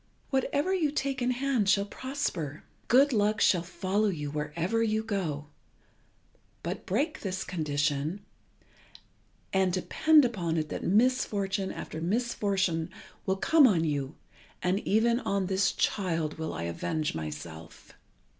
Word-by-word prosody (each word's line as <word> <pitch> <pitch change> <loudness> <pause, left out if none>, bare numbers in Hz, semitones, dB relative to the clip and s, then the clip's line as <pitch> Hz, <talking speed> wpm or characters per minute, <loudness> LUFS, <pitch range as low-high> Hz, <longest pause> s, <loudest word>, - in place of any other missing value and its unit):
Whatever 285 +6 +1
you 335 -6 +2
take 275 -2 -2
in 245 - +1
hand 250 -5 +1
shall 200 0 +4
prosper. 200 - -4 0.2
Good 270 +3 +5
luck 210 0 +2
shall 180 - +4
follow 190 +4 -1
you 150 -7 -3
wherever 165 +8 -1
you 220 -1 +1
go; 175 -9 -2 1.2
but - - -5
break 285 - 0
this 190 -1 -3
condition, 150 +2 -1 1.3
and 190 -1 +3
depend 295 - +4
upon 175 -9 -1
it 155 -1 -1
that - - -4
misfortune 200 -3 +1
after 160 - -6
misfortune 190 -4 0 0.4
will 190 0 +1
come 305 +6 +6
on 175 -8 +2
you, 145 -2 -2 0.5
and 185 +2 +2
even 235 +3 +3
on 200 -6 -1
this 190 +1 +2
child 165 -5 -1
will 160 - -3
I 85 0 -4
avenge 150 - -2
myself. 80 +1 -8
190 Hz, 130 wpm, -29 LUFS, 160-230 Hz, 1.3 s, come